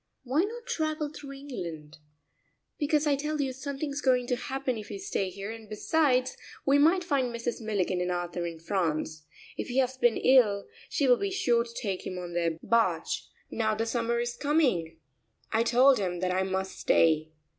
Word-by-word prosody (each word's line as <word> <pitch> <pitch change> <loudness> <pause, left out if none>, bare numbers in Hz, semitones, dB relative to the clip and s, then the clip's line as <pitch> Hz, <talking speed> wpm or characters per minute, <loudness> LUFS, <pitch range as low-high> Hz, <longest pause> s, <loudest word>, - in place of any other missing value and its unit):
"Why 270 +6 +2
not 470 +3 -7
travel 310 -4 -1
through 280 -2 -8
England?" 170 - -7 0.8
"Because 300 0 +2
I 290 -2 +3
tell 300 +2 -3
you 270 -2 0
something's 280 +2 -4
going 250 -3 +3
to 250 - +2
happen 265 +1 -3
if 215 -1 -7
we - - -5
stay 385 - -2
here, 200 +3 -6
and 225 -2 -10
besides 255 +3 +1 0.3
we 280 +1 +4
might 340 +5 +4
find 280 -6 +1
Mrs. 235 +1 -3
Milligan 195 -4 0
and 180 - -1
Arthur 175 -1 -2
in 165 -1 -6
France. 160 -3 -2 0.3
If - - -3
he 250 - -3
has 260 -1 +2
been 240 -3 +3
ill 220 -6 +4 0.2
she 280 - +1
will 245 -1 +6
be 400 - -1
sure 245 -12 +2
to 235 0 -12
take 195 -4 -3
him 185 - -5
on 175 -1 -6
their 170 -2 0
barge, 230 -1 +1 0.2
now 220 -1 0
the 225 +1 -1
summer 235 0 0
is 240 0 -2
coming." 245 - +1 0.5
I 225 - +3
told 250 +2 +5
him 180 -3 -2
that 185 0 +1
I 185 - +1
must 190 0 -2
stay. 155 -1 +3
235 Hz, 190 wpm, -29 LUFS, 185-275 Hz, 0.8 s, will